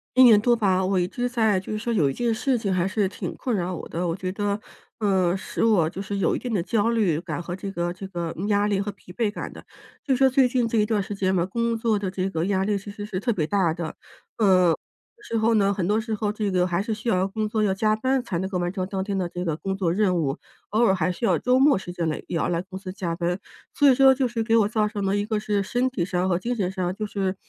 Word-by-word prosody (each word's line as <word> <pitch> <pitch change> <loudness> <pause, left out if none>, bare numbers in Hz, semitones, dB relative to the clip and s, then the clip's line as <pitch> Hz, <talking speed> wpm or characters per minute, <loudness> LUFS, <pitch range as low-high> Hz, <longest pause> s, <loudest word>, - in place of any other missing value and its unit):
1 260 - +8
年 220 -4 +7
多 240 +1 +4
吧， 190 -5 +2
我 185 0 +1
一 175 - +1
直 245 +6 -2
在 220 -5 +2
就 185 - -8
是 215 - -1
说 235 +2 -2
有 155 -10 +3
一 - - -2
件 235 - 0
事 255 +3 0
情 200 -4 -1
还 185 0 +1
是 205 0 +1
挺 190 - -6
困 245 -4 -2
扰 180 -1 -2
我 - - -7
的， 175 +2 -2
我 165 - -1
觉 185 0 -4
得， 205 +1 -1 0.4
嗯， 190 -3 +2
使 - - -3
我 210 -8 +4
就 180 +4 -5
是 200 0 -4
有 195 - +1
一 - - -2
定 245 - -5
的 190 -6 0
焦 210 +4 +1
虑 205 -9 +1
感 165 -3 -5
和 175 - -5
这 195 +1 -6
个 175 -2 -2
这 190 +2 -8
个 170 -3 -4
压 205 -1 +2
力 205 -2 +1
和 205 +1 -3
疲 190 -2 -16
惫 225 +2 0
感 - - -6
的。 - - -11 0.4
就 270 - +1
是 - - -2
说 270 - +5
最 260 0 +4
近 245 -2 +1
这 225 0 +1
一 210 - +3
段 210 -3 0
时 205 - -6
间 190 -1 0
嘛， 170 - +2
工 230 +4 -1
作 225 -2 +1
的 200 -2 -2
这 185 0 -2
个 165 -2 -1
压 190 -1 +1
力 205 +1 0
其 200 +1 -5
实 205 0 -7
是 185 -3 -4
特 240 - 0
别 165 -6 0
大 185 0 +1
的。 165 -1 -5 0.4
嗯， 185 -6 +4 0.5
之 230 - -1
后 225 +1 +3
呢， 200 -2 +3
很 185 -3 -2
多 210 +2 +2
时 225 0 -4
候 210 -1 -1
这 210 -1 -1
个 180 -1 +2
还 175 0 0
是 215 - -4
需 215 +2 -7
要 185 -2 +2
工 215 +2 -2
作， 215 0 0
要 205 - +2
加 215 +2 +2
班 260 +3 0
才 180 - -3
能 190 +1 -2
够 190 - -2
完 175 0 -1
成 185 -2 -2
当 190 -1 -3
天 200 0 -3
的 185 -2 -1
这 180 +1 -5
个 160 -3 -1
工 195 +3 -3
作 180 -4 +1
任 190 -2 +2
务， 145 -2 -1 0.3
偶 220 +3 +2
尔 220 - +5
还 180 -1 0
需 180 - -9
要 - - +3
周 250 0 +3
末 280 0 +5
时 180 -2 -6
间 170 -2 -2
来 155 - -2
也 - - -4
要 - - 0
来 170 -1 0
公 185 +1 -9
司 190 -1 -7
加 175 -4 -3
班。 175 +1 -1 0.3
所 290 -1 +5
以 260 - +5
说 270 0 +7
就 260 -1 0
是 230 -1 -2
给 225 0 +2
我 215 -3 +4
造 215 -1 +1
成 205 -1 -3
了 195 +1 +1
一 205 - -1
个 215 0 -1
是 210 -1 0
身 245 +6 0
体 195 -10 -2
上 180 0 -1
和 175 - +2
精 240 +5 -2
神 190 -5 -1
上 185 -2 -2
就 215 - -3
是 195 -2 -2
200 Hz, 320 characters per minute, -24 LUFS, 185-220 Hz, 0.5 s, 1